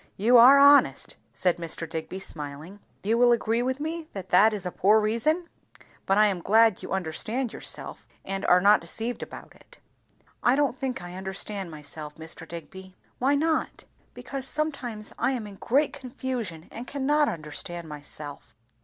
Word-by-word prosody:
"You 230 +6 +4
are 255 +4 +9
honest," 285 +1 +5 0.2
said 180 -2 0
Mr. 165 -1 -3
Digby 160 +3 -5
smiling. 155 +1 -8 0.2
"You 225 +4 +1
will 245 0 +6
agree 230 0 +1
with 260 +2 -1
me 320 +1 -4
that 190 -2 -7
that 210 +5 +6
is 205 -3 -5
a 180 - -3
poor 210 +5 +4
reason; 235 +11 0 0.6
but 195 - +3
I 215 - +6
am 195 -4 0
glad 220 +2 +4
you - - -8
understand 215 +8 -2
yourself, - - -3 0.2
and 195 0 -3
are 180 - +6
not 205 +3 +5
deceived 225 +8 -4
about - - -9
it." - - -16 0.6
"I 245 - +4
don't 285 -3 +1
think 260 -7 -4
I 175 0 -8
understand 190 0 -4
myself, 150 -1 -8
Mr. 160 +1 -7
Digby." 185 +3 -10 0.2
"Why 275 +3 +3
not?" 315 +2 -1 0.3
"Because, 270 -1 -5
sometimes 255 -9 -3
I 265 - +1
am 240 -4 -4
in 200 -1 -10
great 280 +8 +1
confusion, 250 - -5
and 240 +2 -8
can 275 -2 -4
not 295 +1 +3
understand 165 +2 -5
myself." 150 -1 -9
210 Hz, 170 wpm, -26 LUFS, 175-260 Hz, 0.6 s, are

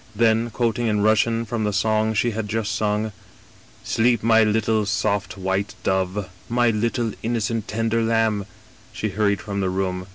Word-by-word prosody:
Then, 115 +1 +2
quoting 120 +1 0
in 105 -2 +1
Russian 115 +2 +2
from 115 0 -2
the 105 - 0
song 110 +2 +1
she 120 +3 +2
had 110 -1 -3
just 110 -2 -1
sung: 105 +1 0 0.4
* - - -27
Sleep, 120 -1 +2
my 115 0 +5
little 110 0 +1
soft 100 -1 -1
white 95 +1 -2
dove: 95 +1 0 0.2
my 120 0 +3
little 115 +1 -1
innocent 115 -1 -1
tender 115 +1 0
Iambi' 110 -3 +1 0.4
She - - -3
hurried 100 -1 0
from 100 -1 -3
the 95 - 0
room. 90 -1 -2
110 Hz, 165 wpm, -23 LUFS, 100-115 Hz, 0.4 s, my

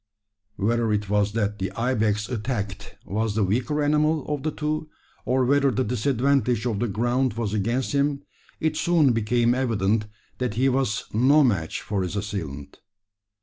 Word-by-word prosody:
Whether 115 +2 +1
it 105 -1 -2
was 105 0 +2
that 105 -2 -1
the 95 0 -2
ibex 110 -3 0
attacked 105 -5 -4
was 105 +2 -1
the 110 - +2
weaker 125 +10 0
animal 150 +1 +2
of 150 -2 -2
the 155 - -1
two, 155 +1 -3 0.4
or 130 0 +2
whether 140 +1 +3
the 130 +1 0
disadvantage 125 0 +1
of 110 -5 -1
the 120 - 0
ground 120 +4 0
was 110 -2 -3
against 115 +5 0
him, 140 0 0 0.4
it 155 -1 0
soon 160 -7 +3
became 115 +2 +2
evident 110 -4 0 0.3
that 125 -4 -2
he 130 +3 +3
was 125 -2 0
no 135 +7 +5
match 95 - 0
for 100 -2 -2
his 90 +1 -3
assailant. 80 -9 -5
120 Hz, 160 wpm, -24 LUFS, 105-135 Hz, 0.4 s, no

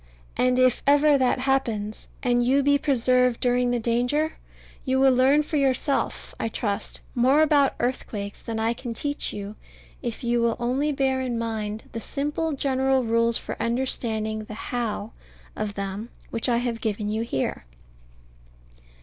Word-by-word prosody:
And 250 0 +2
if 255 -1 +3
ever 290 +1 +5
that 255 -1 +2
happens, 230 -6 -1 0.2
and 245 -1 +2
you 270 +3 +3
be 285 +1 +4
preserved 250 -3 +2
during 245 -1 +2
the 245 0 +1
danger, 245 +7 +1 0.5
you 260 -1 +1
will 265 -1 +5
learn 270 +4 +4
for 300 +1 -2
yourself, 275 0 0
I - - -1
trust, 205 -2 -3
more 265 +5 +4
about 285 -3 +3
earthquakes 210 -5 -3
than 225 -1 -4
I 225 +1 +1
can 235 -1 -6
teach 290 +4 -2
you, 205 +1 -6 0.5
if 240 -2 -5
you 240 0 +1
will 235 -1 +1
only 260 +5 0
bear 265 -2 +1
in 250 -2 -2
mind 220 -2 -3
the 230 - -4
simple 295 +6 -2
general 265 -1 +1
rules 230 0 +2
for - - -5
understanding 225 -3 -1
the 215 - -8
"how" 225 -2 -3 0.4
of 210 -1 -3
them 200 +3 -4 0.2
which 230 +2 -1
I 235 - +3
have 235 -1 -2
given 210 -1 -2
you 215 +1 -1
here. 135 - -2
245 Hz, 160 wpm, -25 LUFS, 225-270 Hz, 0.5 s, ever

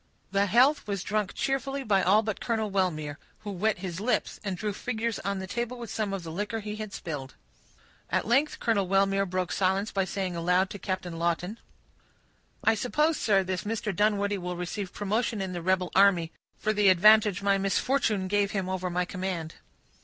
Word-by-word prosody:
The 200 +1 +2
health 255 +6 +4
was 200 -3 -2
drunk 210 -1 -1
cheerfully 270 0 -1
by 200 -5 +3
all 205 +5 +4
but 215 -2 -3
Colonel 220 -3 -1
Wellmere, 155 -6 -1 0.2
who 210 - -5
wet 210 +3 0
his 180 -1 -5
lips, 240 +5 -1
and 195 -3 -3
drew 210 +2 -2
figures 230 +1 -2
on 200 +1 -2
the 190 - -4
table 240 +5 -3
with 235 -3 -7
some 215 -2 -2
of 195 -3 -4
the 165 - -6
liquor 210 +6 -3
he 210 0 -6
had 215 -1 -6
spilled. 145 -8 -6 0.7
At - - 0
length 270 +7 +2
Colonel 205 -5 +1
Wellmere 195 +1 +2
broke 185 -2 -1
silence 195 +2 +1
by 195 -1 0
saying 190 -2 -3
aloud 180 +3 +2
to 205 - -7
Captain 180 -3 -4
Lawton,— 175 +6 -1 1.0
"I 225 - +5
suppose, 300 +8 +1
sir, 195 -3 +3
this 185 0 -3
Mr. 210 -2 -2
Dunwoodie 205 0 +1
will 180 0 -4
receive 180 +2 -4
promotion 215 +2 -1
in 190 -1 -3
the 175 - -4
rebel 185 0 +1
army, 185 -4 +4 0.3
for 215 - 0
the 205 -2 +4
advantage 210 +1 +5
my 200 -1 +3
misfortune 195 0 +1
gave 200 0 +1
him 190 -3 -1
over 185 -1 -2
my 180 +1 0
command." 180 -3 -4
195 Hz, 190 wpm, -28 LUFS, 185-215 Hz, 1.0 s, I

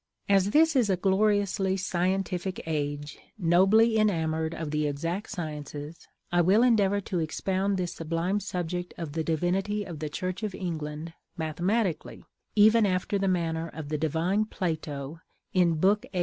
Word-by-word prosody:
As 195 -1 +4
this 320 +5 +4
is 240 -6 +3
a 190 - +2
gloriously 195 0 +2
scientific 185 0 -1
age, 145 -2 -3 0.2
nobly 205 +5 +4
enamored 160 -5 0
of 160 -3 -4
the 150 0 0
exact 165 +8 -3
sciences, 150 -3 -6 0.2
I 175 0 +4
will 195 +7 +4
endeavor 205 -5 +3
to 185 -2 -3
expound 190 +4 -1
this 180 -2 -2
sublime 165 +5 -1
subject 180 -2 -4
of 165 -4 -5
the 160 0 -1
divinity 185 +6 0
of 170 -6 -8
the 155 0 -3
Church 185 +5 -4
of 210 -4 -3
England 160 -2 -5 0.2
mathematically, 175 +4 -1 0.3
even 215 +1 +6
after 185 +2 0
the 195 - 0
manner 165 -2 0
of 150 -1 -7
the 155 - -1
divine 165 +7 +1
Plato 160 -6 -4 0.3
in 175 -3 +3
Book 195 +6 +3
VIII. 180 - -1
180 Hz, 150 wpm, -28 LUFS, 160-200 Hz, 0.3 s, even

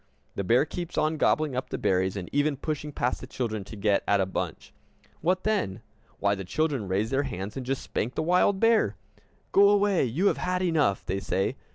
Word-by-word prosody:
The 100 - -3
bear 120 +9 +4
keeps 175 +2 -6
on 155 +1 +1
gobbling 150 -2 +2
up 130 - -3
the - - -3
berries, 95 +1 +1
and 90 -3 -5
even 145 0 +1
pushing 150 +1 -4
past 125 -2 -1
the 130 - -8
children 115 -6 -3
to 110 - -9
get 100 -1 +1
at 100 - +3
a 95 - +2
bunch. 95 - -5 0.5
What 185 +3 0
then? 200 - -1 0.3
Why, 100 0 +2
the 95 -1 -4
children 135 - -1
raise 100 +5 0
their 135 +1 +2
hands, 105 -7 -5
and 135 - -4
just 130 +1 -2
spank 120 +5 -3
the - - 0
wild 180 +3 +3
bear! 225 - +3 0.6
"Go 200 +1 +6
away, 205 -2 +3
you 140 - -1
have - - +3
had 180 0 -1
enough!" 155 - +1
they 95 +1 -1
say. 95 0 -1
135 Hz, 210 wpm, -27 LUFS, 100-165 Hz, 0.6 s, Go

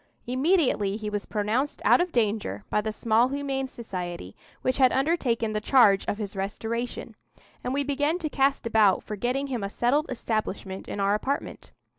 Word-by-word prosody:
Immediately 255 - +2
he 215 -1 -5
was 205 -1 -3
pronounced 220 +7 -1
out - - +6
of 355 0 -1
danger 215 -4 -1
by 210 - +2
the 220 +1 -3
small 225 +2 +2
humane 270 -1 -2
society 180 - -6 0.3
which 255 +1 0
had 255 -1 +6
undertaken 260 -7 +1
the 215 - -1
charge 210 -5 +5
of 205 - -2
his 205 -2 -5
restoration, 225 +5 -4 0.5
and 250 - -2
we 280 +2 0
began 290 +4 0
to 340 -4 -3
cast 275 -2 +1
about 215 -4 +3
for 215 - -5
getting 250 +6 -1
him 250 -6 -3
a 200 - -2
settled 270 +9 +1
establishment 215 -5 -3
in - - -5
our 200 0 +2
apartment. 265 +7 -3
235 Hz, 175 wpm, -26 LUFS, 210-275 Hz, 0.5 s, out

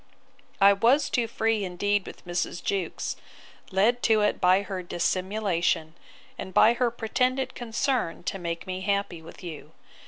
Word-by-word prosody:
'I 200 0 +7
was 240 +9 +3
too 235 -2 +1
free 225 -1 0
indeed 200 +2 -1
with - - -11
Mrs. 175 0 -3
Jewkes, 195 -3 -2 0.5
led 220 +6 +2
to 220 -1 +3
it 210 - +1
by 185 +2 +4
her 190 -2 -5
dissimulation, 180 -2 -1 0.5
and 190 - -7
by 230 - +7
her 245 0 +1
pretended 250 +3 -1
concern 240 -5 -2
to 195 - -3
make 170 -1 -4
me 185 0 -4
happy 200 -3 -1
with 165 +3 -13
you. 165 -4 -8
200 Hz, 150 wpm, -26 LUFS, 180-225 Hz, 0.5 s, I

